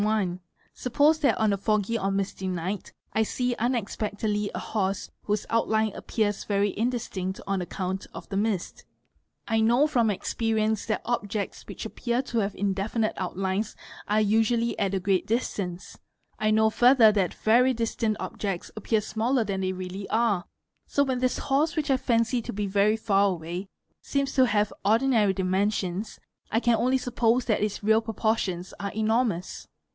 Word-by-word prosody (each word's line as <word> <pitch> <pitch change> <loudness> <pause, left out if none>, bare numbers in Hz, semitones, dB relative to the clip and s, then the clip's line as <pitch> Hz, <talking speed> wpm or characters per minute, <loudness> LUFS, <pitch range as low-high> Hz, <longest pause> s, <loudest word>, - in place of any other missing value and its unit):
one: 205 -4 0 0.3
suppose 290 +5 +2
that 290 - +2
on 215 -2 +2
a - - 0
foggy 215 +2 0
or 195 - 0
misty 195 -1 -2
night 185 +2 -3 0.2
I 220 - +2
see 245 +3 0
unexpectedly 210 -3 -1
a - - -2
horse 195 -2 -2
_ - - -30 0.2
whose 210 0 -1
outline 220 -1 +1
appears 210 -3 -1
very 200 -1 0
indistinct 210 -5 -2
on 195 -1 -1
account 185 +1 -4
of - - -9
the 195 - -4
mist. 200 -3 -1 0.6
I 225 0 +2
know 240 +6 +4
_ - - -1
from 235 -6 +2
experience 220 +1 0
that 215 - -1
objects 210 -3 -3
which - - -7
appear 240 +1 -1
to 235 -3 -2
have 200 -1 -1
indefinite 205 +3 -1
outlines 190 +3 -2 0.3
are 210 +1 +2
usually 225 +2 +2
at 195 0 0
a - - +1
great 190 0 +1
distance; 195 -6 -3 0.4
I 215 - +2
know 220 0 +4
further 245 -2 +6
that 195 -4 0
very 245 +4 +4
distant 225 -2 -1
objects 195 -4 -4
_ - - -20
appear 215 +1 0
smaller 230 +4 0
than 195 -2 -2
they 185 0 0
really 185 +1 -6
are, 220 -5 +1 0.4
so 285 - +2
when 260 -2 -1
this 255 0 +1
horse 290 +4 +1
which 300 -3 0
I 265 - +4
fancy 235 -1 +1
to - - -6
be 205 +1 -2
very 200 +2 +2
far 200 -2 +3
away 175 +2 -4 0.3
seems 275 -1 -1
to 260 -1 +5
have 210 -1 +1
ordinary 220 -1 +3
dimensions, 190 +1 -1 0.3
I 225 - +2
can 240 -1 +3
only 255 +3 +2
suppose 245 -1 +1
that 215 - +1
its 210 0 -2
real 220 +1 +4
proportions 220 -5 -1
are 200 0 -3
enormous. 220 -4 0
215 Hz, 170 wpm, -26 LUFS, 195-235 Hz, 0.6 s, further